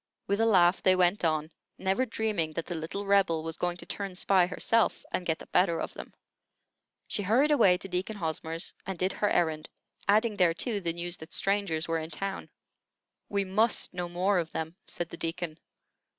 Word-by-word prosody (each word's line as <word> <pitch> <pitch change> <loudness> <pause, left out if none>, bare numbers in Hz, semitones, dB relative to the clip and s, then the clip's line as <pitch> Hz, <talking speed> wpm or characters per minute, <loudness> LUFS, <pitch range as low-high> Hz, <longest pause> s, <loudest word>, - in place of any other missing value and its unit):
With 200 +1 0
a 225 - +4
laugh 180 -4 +5
they 185 - +5
went 180 +2 +3
on, 155 -1 +1 0.3
never 195 +7 0
dreaming 210 -9 -1
that 165 - -3
the 175 - -4
little 165 +5 -4
Rebel 195 -5 +3
was 165 0 -4
going 175 0 -2
to - - -10
turn 195 -2 -5
spy 185 -1 +3
herself, 225 +4 +1
and 180 - -2
get 160 -1 +1
the - - -11
better 175 -3 +2
of - - -4
them. - - -9 1.0
She - - -2
hurried 245 +10 +3
away 200 -11 +5
to 195 - -8
Deacon 185 +4 -3
Hosmer's, 165 -2 -3
and 190 -2 -3
did 185 +3 0
her 205 - +1
errand, 160 -3 0 0.4
adding 210 +1 +3
thereto 185 +5 +1
the 170 -3 -1
news 175 +1 -4
that 160 +1 -11
strangers 195 -5 0
were 165 0 0
in 160 0 -6
town. 195 +5 -4 0.8
"We 200 -1 0
must 215 +4 +1
know 175 -1 -3
more 180 +2 +2
of 165 -1 -3
them," 160 +1 -4
said 170 -1 -5
the - - -9
Deacon. 165 -1 -4
180 Hz, 195 wpm, -29 LUFS, 165-200 Hz, 1.0 s, laugh